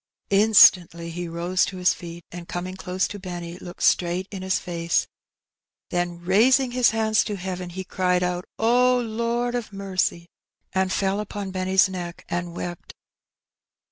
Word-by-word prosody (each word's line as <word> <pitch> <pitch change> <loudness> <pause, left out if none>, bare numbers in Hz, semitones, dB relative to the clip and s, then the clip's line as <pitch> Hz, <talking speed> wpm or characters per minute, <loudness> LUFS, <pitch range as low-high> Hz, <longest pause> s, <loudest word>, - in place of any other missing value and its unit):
Instantly 185 -5 +5
he 175 +1 -5
rose 170 +2 0
to 190 - -3
his 180 0 +3
feet, 170 0 -9
and, 175 -1 -8
coming 180 +1 -5
close 185 0 -2
to 205 - -8
Benny, 175 -2 -7
looked 175 -1 -8
straight 180 +2 +2
in 195 -2 -6
his 190 +1 0
face. 170 -1 -1 0.9
Then 175 -1 -1
raising 245 +8 +4
his 250 -1 +4
hands 220 -1 +2
to 210 - -3
heaven, 185 -1 -5
he 190 +2 -6
cried 180 -1 0
out, 180 0 -1 0.2
^' 245 0 +2
Lord 235 +1 -1
of 240 -3 -3
mercy! 190 -3 -2 0.5
and 190 0 +1
fell 195 +1 0
upon 205 -2 -5
Benny*s 185 +1 +3
neck 180 -2 -7
and 175 0 -3
wept. 175 -1 -7
185 Hz, 155 wpm, -24 LUFS, 175-205 Hz, 0.9 s, Instantly